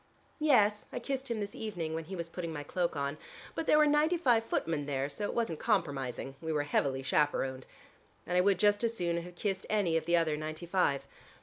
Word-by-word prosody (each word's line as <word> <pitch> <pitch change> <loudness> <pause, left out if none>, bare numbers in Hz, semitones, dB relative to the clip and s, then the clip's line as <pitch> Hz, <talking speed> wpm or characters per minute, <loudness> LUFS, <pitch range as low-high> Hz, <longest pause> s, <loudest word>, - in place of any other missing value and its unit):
"Yes, 215 -9 +3
I - - -4
kissed 270 +1 -3
him 230 -2 -1
this 205 -1 -4
evening, 175 -8 -4
when 160 0 -3
he 190 +4 -6
was 170 -2 -4
putting 170 0 -5
my 145 -2 -5
cloak 170 +3 -1
on, 140 +1 -2 0.3
but 325 - -3
there - - +6
were 305 - +6
ninety 300 +4 +3
five 245 -8 +3
footmen 160 -9 -1
there 135 -1 -1
so 205 +8 -4
it - - -3
wasn't 225 -10 -1
compromising: 140 - -1
we 160 -1 -3
were 150 -2 +1
heavily 135 -2 0
chaperoned. 135 -2 0 0.6
And 180 - -2
I 180 - +6
would 195 0 +3
just 205 +3 +3
as 230 0 0
soon 170 -1 0
have 175 +1 -10
kissed 195 +1 -2
any 190 -6 +2
of 160 - -3
the 170 +1 +3
other 160 -2 +2
ninety 155 +2 -5
five. 170 -6 +1
175 Hz, 220 wpm, -32 LUFS, 150-210 Hz, 0.6 s, there